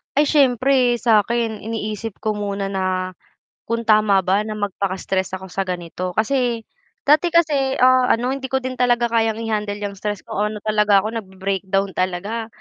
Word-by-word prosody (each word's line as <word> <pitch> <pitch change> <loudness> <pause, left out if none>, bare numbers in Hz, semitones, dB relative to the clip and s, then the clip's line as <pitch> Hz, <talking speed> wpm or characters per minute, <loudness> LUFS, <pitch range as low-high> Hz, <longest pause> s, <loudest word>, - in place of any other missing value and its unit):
Ay 290 +1 +4
siyempre 255 -3 +3
sakin 225 0 +1
iniisip 220 -1 -4
ko 215 -1 -1
muna 200 -1 -3
na, 185 -1 -2 0.5
kung 230 0 -1
tama 215 -3 +4
ba 190 +3 +2
na 215 - -4
magpaka-stress 190 -2 -2
ako 190 -1 -10
sa 195 -1 -2
ganito 180 0 -4
kasi, 235 0 0 0.4
dati 305 +4 +4
kasi, 295 -6 +2
ah, 255 0 +4
ano 245 +2 +1
hindi 270 0 -4
ko 265 +1 0
din 255 0 -5
talaga 240 -1 +2
kayang 225 -1 +2
i-handle 210 -2 -2
yang 200 -1 -4
stress 205 -1 -3
ko, 210 +1 -2
ano 210 -1 -7
talaga 210 -2 +3
ako 215 - -3
nag-be-breakdown 195 0 -2
talaga, 195 +5 -2
215 Hz, 160 wpm, -21 LUFS, 195-240 Hz, 0.5 s, Ay